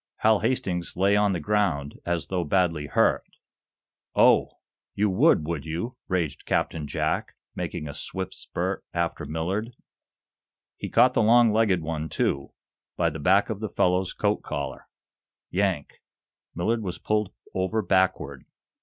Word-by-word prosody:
Hal 110 -1 +5
Hastings 95 -9 -1
lay 100 +2 +4
on 105 -1 +3
the 85 - -1
ground, 80 -6 0
as 85 -4 0
though 90 +3 -1
badly 80 -2 +1
hurt. - - +1 0.8
"Oh, - - +5 0.4
you 105 0 +2
would, 105 - +4
would 80 -3 -3
you?" 85 +11 -4
raged 85 -6 -2
Captain 75 -3 0
Jack - - -1
Benson, - - -56
making 75 - -4
a 70 - -6
swift 95 +5 -5
spurt - - -3
after - - -1
Millard. 95 +9 -3 1.0
He - - -6
caught 125 +2 +5
the - - +3
long 115 0 +5
legged 105 -6 +2
one, 80 0 -3
too, 70 0 -1 0.5
by 85 -2 +2
the 80 - -6
back 95 +8 +3
of 105 - -4
the 110 -1 -3
fellow's 90 0 +1
coat 105 0 0
collar. 70 -1 -5 0.6
Yank! 95 -6 -1 0.5
Millard 110 +7 0
was 90 -4 -4
pulled 105 -2 0 0.2
over 95 +4 0
backward. 90 -8 +1
95 Hz, 145 wpm, -26 LUFS, 80-105 Hz, 1.0 s, Hal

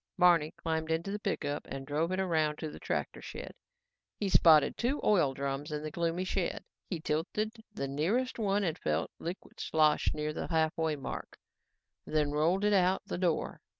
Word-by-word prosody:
Barney 170 -4 +5
climbed 160 -1 -2
into 165 +4 -1
the 205 - -3
pickup 145 -8 -2
and 135 0 -5
drove 155 +5 0
it 185 - 0
around 160 -5 +1
to 155 - -5
the - - -10
tractor - - -3
shed. - - -7 0.6
He 205 - -1
spotted 160 -5 +6
two 260 +5 0
oil 165 -11 +3
drums 140 +2 -3
in 150 0 -3
the 155 - -4
gloomy 170 +2 -1
shed. 185 -1 -2 0.3
He 175 - -2
tilted 210 +9 -2
the 170 -10 -3
nearest 200 - 0
one 205 -1 +1
and 165 -4 -1
felt 75 +1 -1
liquid 175 +3 -7
slosh 155 -1 +3
near 150 0 -2
the - - -4
halfway 160 -1 +1
mark, 140 - -6 0.7
then 150 -2 0
rolled 165 +7 +2
it 210 - +3
out 185 -1 +3
the - - -4
door. 175 -4 0
160 Hz, 180 wpm, -31 LUFS, 150-190 Hz, 0.7 s, spotted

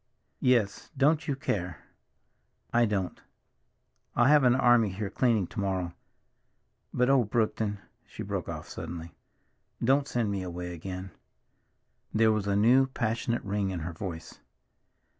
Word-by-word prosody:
"Yes. 120 -6 +1
Don't 150 +3 +3
you 140 - 0
care." 90 - -2 1.0
"I 120 0 +5
don't. 100 -4 -2 0.9
I'll 120 - +4
have 145 +1 +6
an 125 -1 +5
army 120 -4 +4
here 100 +1 -4
cleaning 115 -7 +2
to 110 - -7
morrow. 95 -3 -1 1.0
But 125 - +2
oh, 135 -2 +5
Brookton—" 110 -1 0 0.3
she - - -7
broke - - -4
off - - -6
suddenly—"don't 115 - -4
send 115 -6 0
me 100 -1 -2
away 90 -1 -5
again!" 90 +2 -6 1.0
There 110 0 +5
was 105 -2 -1
a 100 - +1
new, 125 +6 +5
passionate 115 -1 -1
ring 100 -1 -1
in 90 -3 -4
her 85 +2 -4
voice. 85 -2 -7
105 Hz, 135 wpm, -29 LUFS, 95-120 Hz, 1.0 s, have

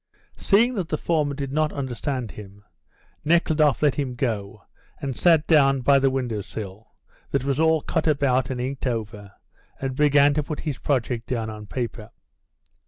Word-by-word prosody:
Seeing 230 +5 +3
that 190 -8 -3
the 155 - -1
foreman 150 -4 0
did 140 -1 -4
not 155 0 +1
understand 125 -2 -4
him, 100 -1 -12 0.6
Nekhludoff 155 -3 +2
let 145 -3 +4
him 135 -4 -3
go 110 -6 -3 0.4
and 135 -2 -4
sat 165 -3 +4
down 135 -4 +4
by 140 +2 +4
the 135 0 +3
window 125 -5 -2
sill, 105 +1 -8 0.4
that - - 0
was 140 +1 -1
all 160 -1 +3
cut - - -1
about 135 -4 +2
and 130 -2 -3
inked 130 +2 -3
over, 105 -4 -4 0.5
and 135 -1 -3
began 145 0 +4
to 150 - +1
put 150 +1 -5
his 150 -5 -4
project 125 -4 -1
down 115 -3 -2
on 105 -1 -9
paper. 115 -3 -5
135 Hz, 170 wpm, -24 LUFS, 115-150 Hz, 0.6 s, let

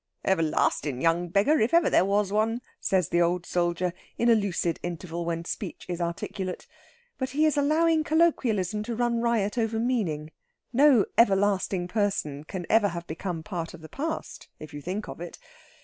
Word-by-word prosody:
"Everlastin' 155 -6 +1
young 170 +3 +2
beggar, 205 - +3
if 230 +9 +2
ever 340 -2 +5
there - - +4
was 200 0 +1
one," 225 +3 +1 0.2
says 185 -5 +1
the 175 - +2
old 175 +1 +1
soldier, 175 0 0 0.2
in 235 0 +3
a - - +8
lucid 190 -6 0
interval 170 0 -5
when 165 0 -3
speech 185 +1 -5
is 175 -1 -4
articulate. 180 +2 -4 0.5
But 260 -1 -1
he 300 +4 +2
is 310 - +2
allowing 315 +2 +3
colloquialism 235 - +1
to 235 - -3
run 235 0 0
riot 235 -2 +1
over 225 0 0
meaning. 195 -11 -1 0.4
No 265 -4 +5
everlasting 195 -4 +3
person 180 -8 -1
can 180 +1 -5
ever 220 -2 +4
have 170 -2 -5
become 165 0 -5
part 170 -3 -5
of 165 - -14
the 160 - -11
past 315 +3 -5
if 155 - -11
you 145 - -7
think 190 +7 -4
of - - -8
it. 175 - -7
195 Hz, 175 wpm, -27 LUFS, 170-235 Hz, 0.5 s, a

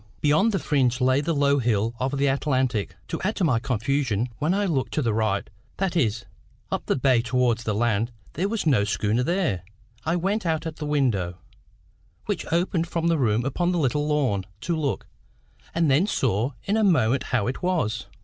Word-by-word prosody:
Beyond 155 +10 +3
the 195 - 0
fringe 130 -7 +1
lay 130 +2 +3
the 165 +2 -1
low 140 0 +3
hill 115 -2 +1
of 135 +2 -1
the 140 - +2
Atlantic. 130 -5 0
To - - -3
add 210 +4 -1
to 195 - -1
my 130 -9 +3
confusion, 125 -1 0
when 155 +3 +1
I 200 +2 +1
looked 145 -8 -1
to 150 - +1
the 115 -3 +1
right, 110 -2 0 0.3
that 190 -2 -1
is, 115 -8 +1 0.5
up - - -3
the - - +2
bay 130 -3 +3
towards 120 -1 +1
the 105 - 0
land, 115 +1 +1 0.2
there 190 +6 -1
was 225 -4 -2
no 135 -10 +4
schooner 105 +3 0
there. 150 - 0 0.4
I 165 +2 0
went 195 +5 0
out 165 -2 -1
at 160 -1 -5
the 150 - -4
window, 115 -12 0 0.9
which - - -3
opened 170 0 +1
from 170 0 0
the 165 -2 +2
room 115 -2 +1
upon 175 +6 0
the - - 0
little 145 0 +1
lawn, 130 -11 +1 0.2
to 170 - -1
look, 145 -5 -2 0.7
and 165 -4 +3
then 155 +9 +3
saw 125 - 0
in 205 +2 0
a 220 - +2
moment 135 - +3
how 120 -6 0
it 125 - -3
was. 155 - -1
135 Hz, 195 wpm, -25 LUFS, 115-165 Hz, 0.9 s, no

